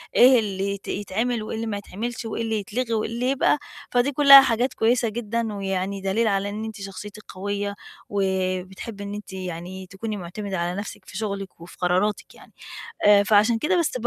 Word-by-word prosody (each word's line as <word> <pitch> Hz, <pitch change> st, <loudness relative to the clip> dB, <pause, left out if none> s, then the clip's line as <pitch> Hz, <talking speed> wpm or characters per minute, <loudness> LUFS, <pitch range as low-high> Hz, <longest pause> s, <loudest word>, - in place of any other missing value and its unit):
إيه 250 Hz, 0 st, +7 dB
اللي 195 Hz, -2 st, -2 dB
يت 200 Hz, -, -9 dB
يتعمل 220 Hz, +3 st, -1 dB
وإيه 215 Hz, -, -5 dB
اللي 225 Hz, +1 st, -3 dB
ما 205 Hz, -, -2 dB
يتعملش 225 Hz, +4 st, -5 dB
وإيه 225 Hz, +1 st, -3 dB
اللي 220 Hz, -1 st, -1 dB
يتلغي 230 Hz, +4 st, -3 dB
وإيه 220 Hz, 0 st, 0 dB
اللي 245 Hz, +3 st, -1 dB
يبقى، 275 Hz, +2 st, +3 dB, 0.3 s
فدي 245 Hz, +3 st, +2 dB
كُلّها 275 Hz, -1 st, +10 dB
حاجات 250 Hz, 0 st, +1 dB
كويسة 230 Hz, 0 st, +2 dB
جدًا، 225 Hz, 0 st, -2 dB
ويعني 195 Hz, 0 st, -2 dB
دليل 200 Hz, +4 st, +1 dB
على 200 Hz, -1 st, +1 dB
إن 215 Hz, +2 st, -4 dB
أنتِ 220 Hz, -2 st, -7 dB
شخصيتِك 205 Hz, +2 st, -8 dB
قوية 200 Hz, +1 st, -3 dB, 0.3 s
وبتحبي 190 Hz, +1 st, -2 dB
إن 200 Hz, -, -5 dB
أنتِ 205 Hz, -2 st, -8 dB
يعني 185 Hz, 0 st, -6 dB
تكوني 210 Hz, +3 st, -5 dB
مُعتمِدة 190 Hz, +2 st, -5 dB
على 175 Hz, +3 st, -2 dB
نَفسِك 205 Hz, -, -8 dB
في 190 Hz, -, -9 dB
شُغلِك 200 Hz, -5 st, -5 dB
وفي 170 Hz, -, -12 dB
قراراتِك 185 Hz, +4 st, 0 dB
يعني. -, -, -17 dB, 0.5 s
آآ 205 Hz, -1 st, +8 dB
فعشان 215 Hz, +3 st, +4 dB
كده 355 Hz, +9 st, +1 dB
بس 310 Hz, -6 st, 0 dB
ب 240 Hz, -, -2 dB
205 Hz, 190 wpm, -24 LUFS, 195-230 Hz, 0.5 s, كُلّها